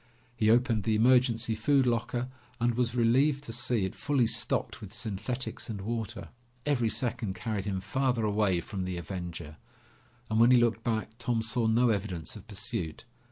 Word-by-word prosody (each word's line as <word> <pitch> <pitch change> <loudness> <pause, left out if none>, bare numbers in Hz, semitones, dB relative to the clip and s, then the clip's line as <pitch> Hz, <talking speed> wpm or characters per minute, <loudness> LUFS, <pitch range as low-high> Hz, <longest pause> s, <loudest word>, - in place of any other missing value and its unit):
He 110 -2 +2
opened 115 -1 +3
the 110 +2 +1
emergency 120 -1 +3
food 130 +5 +3
locker 120 +1 0 0.3
and 120 0 +2
was 120 0 0
relieved 135 +5 +3
to 115 - -5
see 120 -3 +1
it 95 - -4
fully 140 -5 +1
stocked - - -1
with 100 -3 -9
synthetics 115 +4 -4
and 105 -3 -4
water. 115 -1 -4 0.4
Every 125 -6 +2
second 110 -5 -2
carried 105 -4 -3
him 95 -2 -2
farther 130 -2 0
away 100 -4 +2
from 95 -1 -5
the 90 -1 -3
Avenger, 85 -3 -6 0.7
and 110 0 0
when 115 +1 +7
he 125 - +7
looked 115 -1 +2
back, 110 -1 -2
Tom 115 -2 0
saw 115 0 0
no 120 +2 +4
evidence 95 -6 -2
of 105 - -11
pursuit. 105 -5 -4
115 Hz, 170 wpm, -29 LUFS, 100-120 Hz, 0.7 s, when